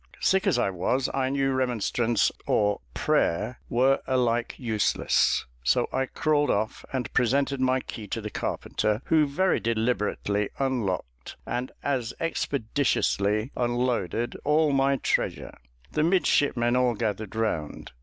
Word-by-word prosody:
Sick 190 Hz, +1 st, +2 dB
as 170 Hz, -10 st, +3 dB
I 120 Hz, -5 st, +1 dB
was, 125 Hz, +9 st, 0 dB
I 130 Hz, -1 st, 0 dB
knew 135 Hz, 0 st, +1 dB
remonstrance 120 Hz, -3 st, +1 dB, 0.2 s
or 105 Hz, -1 st, +2 dB
prayer 100 Hz, +9 st, 0 dB
were 130 Hz, +3 st, +3 dB
alike 120 Hz, -2 st, +1 dB
useless, 110 Hz, -5 st, +1 dB, 0.2 s
so -, -, +2 dB
I 130 Hz, 0 st, 0 dB
crawled 150 Hz, 0 st, +1 dB
off 110 Hz, +2 st, -1 dB
and 130 Hz, -2 st, -3 dB
presented 135 Hz, +2 st, +1 dB
my 130 Hz, 0 st, +2 dB
key 110 Hz, -4 st, -8 dB
to 115 Hz, -, -3 dB
the 105 Hz, -1 st, -6 dB
carpenter, 105 Hz, +3 st, -2 dB
who 155 Hz, -2 st, +3 dB
very 185 Hz, +7 st, +1 dB
deliberately 110 Hz, -3 st, 0 dB
unlocked, 95 Hz, -, -3 dB
and 125 Hz, +1 st, -3 dB
as 130 Hz, -4 st, -1 dB
expeditiously 120 Hz, -7 st, 0 dB
unloaded 120 Hz, -3 st, -1 dB
all 150 Hz, +1 st, +3 dB
my 135 Hz, 0 st, +3 dB
treasure. -, -, -1 dB, 0.4 s
The 155 Hz, -, 0 dB
midshipmen 145 Hz, -8 st, +2 dB
all 125 Hz, -2 st, +2 dB
gathered 105 Hz, -1 st, -3 dB
round. 105 Hz, -9 st, -2 dB
125 Hz, 130 wpm, -26 LUFS, 110-135 Hz, 0.4 s, as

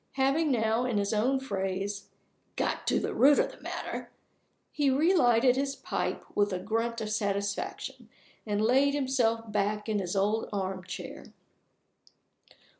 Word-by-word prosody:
Having 275 Hz, +4 st, +2 dB
now, 225 Hz, -1 st, +2 dB
in 240 Hz, -4 st, 0 dB
his 200 Hz, +1 st, 0 dB
own 250 Hz, +6 st, +2 dB
phrase, 195 Hz, -4 st, -3 dB, 0.5 s
"got -, -, -2 dB
to -, -, +3 dB
the -, -, -3 dB
root 285 Hz, +2 st, +6 dB
of -, -, +2 dB
the -, -, -16 dB
matter," -, -, -5 dB, 0.6 s
he 290 Hz, -2 st, +1 dB
relighted 260 Hz, -5 st, +4 dB
his 275 Hz, +1 st, -1 dB
pipe -, -, -3 dB
with 205 Hz, 0 st, +2 dB
a 185 Hz, -, -1 dB
grunt 225 Hz, +4 st, -2 dB
of 215 Hz, -1 st, -3 dB
satisfaction, 200 Hz, -1 st, -3 dB, 0.3 s
and 210 Hz, -1 st, -1 dB
laid 270 Hz, +5 st, +4 dB
himself 235 Hz, -5 st, 0 dB
back 210 Hz, +1 st, -1 dB
in 215 Hz, -2 st, 0 dB
his 180 Hz, 0 st, -3 dB
old 210 Hz, +3 st, +1 dB
armchair. 190 Hz, -2 st, -5 dB
220 Hz, 140 wpm, -29 LUFS, 200-265 Hz, 0.6 s, root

